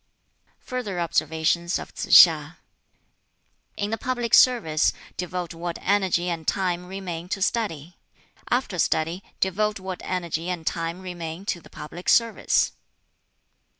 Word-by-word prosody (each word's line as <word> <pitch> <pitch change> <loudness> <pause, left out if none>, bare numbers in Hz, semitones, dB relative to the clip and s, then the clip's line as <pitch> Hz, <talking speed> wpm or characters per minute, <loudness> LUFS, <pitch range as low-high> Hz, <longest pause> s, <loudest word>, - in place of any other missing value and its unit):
Further 220 -8 -4
observations 165 +1 0
of - - -9
Tsz - - -5 0.2
hiŠ: - - -6 1.2
"In 205 0 -2
the 225 - -2
public 245 -2 -2
service 195 -12 +5 0.2
devote 180 -1 -4
what 170 0 -5
energy 190 -3 +1
and 165 -3 -3
time 180 -2 0
remain 180 -3 -6
to 195 - -2
study. 180 -6 -2 0.5
After 240 -7 0
study 165 +4 0 0.2
devote 210 +3 0
what 185 -1 -6
energy 170 -2 -3
and 175 -3 -4
time 165 +2 -2
remain 175 -1 -6
to 175 -4 -2
the - - -16
public 175 +4 -6
service. 230 -1 +3
180 Hz, 125 wpm, -24 LUFS, 170-200 Hz, 1.2 s, service